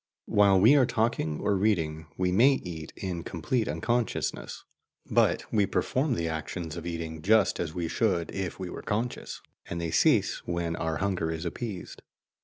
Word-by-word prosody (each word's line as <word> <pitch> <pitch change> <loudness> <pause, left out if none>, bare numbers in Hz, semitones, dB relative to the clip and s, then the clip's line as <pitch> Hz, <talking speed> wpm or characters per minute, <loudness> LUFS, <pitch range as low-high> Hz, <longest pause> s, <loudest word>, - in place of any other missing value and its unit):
While 100 -2 +4
we 115 +9 +7
are 130 -4 +5
talking 110 -9 0
or 100 - +2
reading, 80 -6 0
we 90 0 +1
may 120 +9 +6
eat 80 -3 -7
in 90 -3 -4
complete 105 +8 -1
unconsciousness; 120 +1 -2 0.4
but - - +2
we 105 -2 +3
perform 130 +5 0
the 85 -4 -1
actions 80 +1 -4
of - - -6
eating 80 -2 -5
just 105 +3 +3
as 80 -2 -3
we 85 -2 -1
should 90 -3 0
if 95 -2 -3
we 95 - -4
were - - -6
conscious, 115 +3 -3 0.3
and 85 - -3
they 85 -1 -2
cease - - +3
when 85 -1 -1
our 80 -1 -2
hunger 95 -4 -1
is 80 +1 -4
appeased. 100 +2 -5
90 Hz, 170 wpm, -28 LUFS, 80-110 Hz, 0.4 s, we